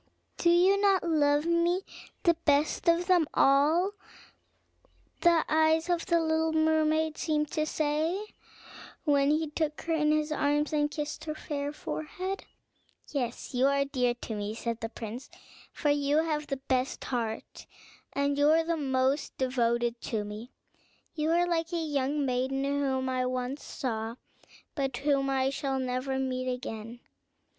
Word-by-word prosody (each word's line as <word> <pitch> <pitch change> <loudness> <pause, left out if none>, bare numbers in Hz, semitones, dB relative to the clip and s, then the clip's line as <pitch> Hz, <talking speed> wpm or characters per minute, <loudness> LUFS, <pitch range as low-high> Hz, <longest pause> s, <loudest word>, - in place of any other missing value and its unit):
"Do 340 - +3
you 370 +4 +5
not 390 -2 +3
love 295 -2 +3
me 340 +2 +2 0.4
the 340 - +5
best 305 0 +1
of 340 +1 +3
them 355 -4 +3
all?" 305 +8 +4 1.3
the 340 -2 +4
eyes 320 +2 +3
of 345 -1 -1
the 340 -3 +3
little 320 0 +1
mermaid 315 0 +2
seemed 300 -2 0
to 310 0 0
say, 310 +4 0 0.8
when 285 -2 +3
he 305 0 +1
took 305 -1 -2
her 330 - -1
in 300 -1 +2
his 305 0 +1
arms, 295 +1 +1
and 295 -1 +2
kissed 295 0 -5
her 305 -1 -3
fair 285 -2 -4
forehead. 365 +6 -5 0.6
"Yes, 250 -4 -3
you 255 +2 +3
are 280 0 +2
dear 250 -3 0
to 240 - -6
me," 210 0 -4
said 230 0 -3
the 225 - -3
prince; 230 +2 -7 0.4
"for 295 - 0
you 290 +2 +2
have 300 -2 -2
the 275 - -2
best 260 -1 -1
heart, 230 -3 -4 0.4
and 280 0 0
you 290 +1 +5
are 325 +1 +4
the 335 0 0
most 265 0 0
devoted 240 -2 0
to 215 -3 -2
me; 210 +4 -8 0.6
you 310 -1 -1
are 345 +1 +3
like 330 -1 -1
a - - +1
young 290 -2 0
maiden 260 +1 0
whom 275 -2 0
I 255 -1 0
once 255 +2 -3
saw, 225 -3 -4 0.6
but 270 -4 -2
whom 275 0 +1
I 265 0 +1
shall 275 -1 -2
never 260 +1 -2
meet 255 -1 -1
again. 235 -1 -6
290 Hz, 155 wpm, -29 LUFS, 260-315 Hz, 1.3 s, you